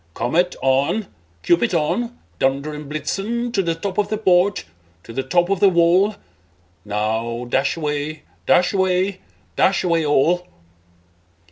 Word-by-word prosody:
Comet, 170 +10 0
on! 135 +11 +1 0.4
Cupid, 175 - +2
on! 235 +10 -1 0.2
Dunder 140 +3 0
and 150 -1 -8
Blitzen 210 +10 -3
To 195 - +2
the 165 -3 -1
top 190 +4 -4
of 205 - +1
the 215 - -1
porch, 190 -1 +2 0.4
to 115 - -11
the 135 - -1
top 175 +7 +1
of 195 - +1
the 200 0 +6
wall! 180 +4 +3 0.7
Now, 110 +3 -2
dash 135 +5 0
away, 150 0 -3 0.2
dash 180 +2 +4
away, 190 0 +1 0.4
dash 195 +1 +2
away 170 -2 +1
all!" 165 +5 +2
170 Hz, 140 wpm, -20 LUFS, 140-195 Hz, 0.7 s, the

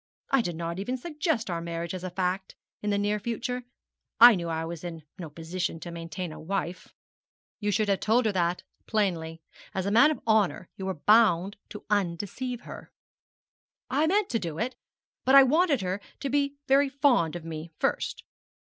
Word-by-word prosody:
I 270 - +5
did 175 -6 -3
not 170 +2 -4
even 250 +6 -2
suggest 300 -3 -2
our 170 -2 -2
marriage 170 0 -4
as 185 -1 -5
a 185 - -3
fact 185 +1 -2 0.3
in 210 - -2
the 200 - +2
near 205 +1 0
future. 240 +3 -3 0.5
I 240 +1 +11
knew 170 -4 -2
I 160 0 -2
was 170 0 -6
in 165 -2 -6 0.2
no 165 -3 -6
position 165 +2 -4
to 175 - -7
maintain 165 +1 -5
a - - -9
wife.' 185 0 -3 0.7
'You 210 - -1
should 205 +1 +1
have 195 -1 +2
told 230 +3 +2
her 215 - +3
that 175 -2 0 0.2
plainly. 165 -7 -1 0.3
As 190 -1 -1
a 200 - 0
man 235 +8 +7
of 310 - -2
honour 215 -5 +2
you 190 - -5
were 190 - -2
bound 200 +1 +4
to 210 - -9
undeceive 205 +6 -1
her.' - - -10 1.0
'I 295 +4 +2
meant 400 +3 +2
to 230 - +1
do 165 -5 -5
it, 250 +6 -2 0.5
but 265 +2 +5
I 275 - +11
wanted 300 - +3
her 185 +2 -2 0.2
to 275 -2 -2
be 285 0 +1
very 275 +1 +4
fond 260 - +2
of 170 -2 -7
me 160 0 -6
first. - - -1
200 Hz, 190 wpm, -28 LUFS, 170-245 Hz, 1.0 s, I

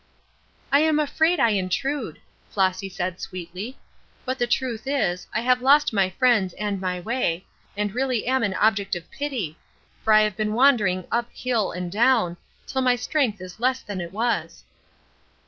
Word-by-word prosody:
"I'm 305 +2 +4
afraid 320 +3 +2
I 235 - +4
intrude," 210 +9 -2 0.3
Flossy 190 0 0
said, 180 -1 -4
sweetly; 185 +8 -7 0.5
"but 260 +1 -2
the 240 - +1
truth 240 -1 -1
is, 180 -11 0
I - - -1
have 250 +1 +2
lost 285 +1 +4
my 195 -3 +2
friends 215 -3 +2
and 205 -2 -3
my 180 -1 -2
way, 185 -4 -1 0.3
and 205 0 -1
I - - -16
really 255 -2 0
am 260 +2 +1
an 200 -4 0
object 205 -2 +2
of 175 -1 -8
pity, 245 - -4 0.4
for 220 - +2
I 215 0 +7
have 215 -2 +1
been 215 0 -1
wandering 215 -9 +3
up 235 0 0
hill 240 -5 -1
and 180 0 -5
down, 220 -5 +3 0.3
till 265 - -2
my 250 -1 +3
strength 245 -4 0
is 185 +2 -10
less 255 +1 +1
than 200 -3 -5
it 170 -1 -6
was." 230 +4 -2
220 Hz, 170 wpm, -24 LUFS, 185-255 Hz, 0.5 s, I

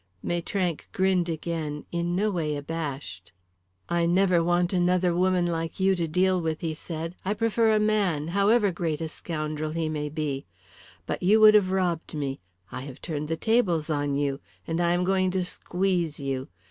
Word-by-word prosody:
Maitrank 175 -1 -2
grinned 185 -2 +2
again, 160 -2 -3
in 170 0 -1
no 210 +3 +1
way 155 -5 -1
abashed. 145 - -5 0.6
"I 170 0 +1
never 180 -1 +3
want 175 +2 +1
another 180 -1 +2
woman 180 0 +2
like 165 0 -3
you 190 0 +4
to 170 -2 -1
deal 185 +3 +2
with," 160 -1 -2
he 160 -2 -2
said. 165 +1 -6
"I 200 +3 -1
prefer 225 0 +2
a 215 - +3
man, 200 -8 +1
however 200 +3 +3
great 165 -3 -2
a 160 - -2
scoundrel 155 -1 -4
he 160 0 -2
may 150 -1 -3
be. 145 -3 -3 0.6
But - - -3
you 205 +5 +5
would 215 0 +9
have 205 -3 +5
robbed 175 -4 -1
me; 140 -2 -3 0.3
I - - -5
have 135 0 -9
turned 150 -3 -4
the 160 +1 -2
tables 175 -8 +1
on 145 -1 0
you. 140 -1 -1 0.3
And 165 +1 -1
I 170 0 +3
am 175 +1 +1
going 185 0 +2
to 185 0 0
squeeze 180 -3 -1
you. 135 -2 -3
170 Hz, 180 wpm, -26 LUFS, 155-185 Hz, 0.6 s, would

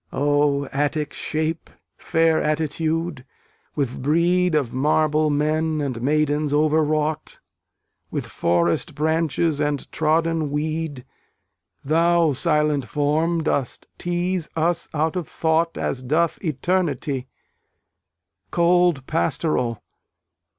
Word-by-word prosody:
O 145 0 +1
Attic 145 +1 -1
shape! 160 +1 -3 0.3
Fair 160 -1 +2
attitude! 160 0 -1 0.5
with 135 -4 -2
brede 170 +4 +2
Of 140 -6 0
marble 155 +3 +2
men 155 +2 0
and 130 -5 -3
maidens 150 +1 +1
overwrought, 155 0 0 0.7
With - - -3
forest 85 - 0
branches 160 0 0
and 145 -2 -1
trodden 160 0 +1
weed; 150 -2 -3 0.8
Thou, 165 +1 +3
silent 150 -1 +1
form! 155 +5 0
dost 135 -5 -1
tease 175 -1 -1
us 165 +1 0
out 155 +2 0
of 180 -4 -3
thought 165 +1 0
As 130 - -2
doth 155 +8 0
eternity: 150 -5 -1 1.2
Cold 175 -4 +3
Pastoral! 120 - -1
155 Hz, 95 wpm, -22 LUFS, 145-165 Hz, 1.2 s, Thou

